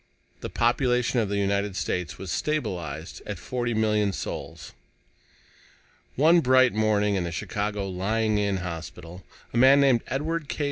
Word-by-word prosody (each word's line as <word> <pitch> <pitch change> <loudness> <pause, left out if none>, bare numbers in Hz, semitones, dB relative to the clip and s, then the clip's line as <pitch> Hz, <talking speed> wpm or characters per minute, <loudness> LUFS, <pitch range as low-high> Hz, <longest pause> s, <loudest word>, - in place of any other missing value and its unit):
The - - -6
population 125 +1 +1
of 110 -3 0
the 100 - -1
United 100 0 0
States 90 -2 -3
was 95 - -6
stabilized 90 - -3
at - - -4
forty 120 -2 -3
million 105 -2 +1
souls. - - -6 1.4
One 165 +5 +5
bright 130 -3 +4
morning 105 -1 +2
in 95 -2 0
the 85 - -4
Chicago 105 +4 -3
Lying 105 +3 0
in 100 -1 0
Hospital, 85 +1 -8 0.3
a - - -1
man 135 +3 +7
named 135 -4 +4
Edward 155 +2 -2
K. - - -5
105 Hz, 145 wpm, -26 LUFS, 95-125 Hz, 1.4 s, man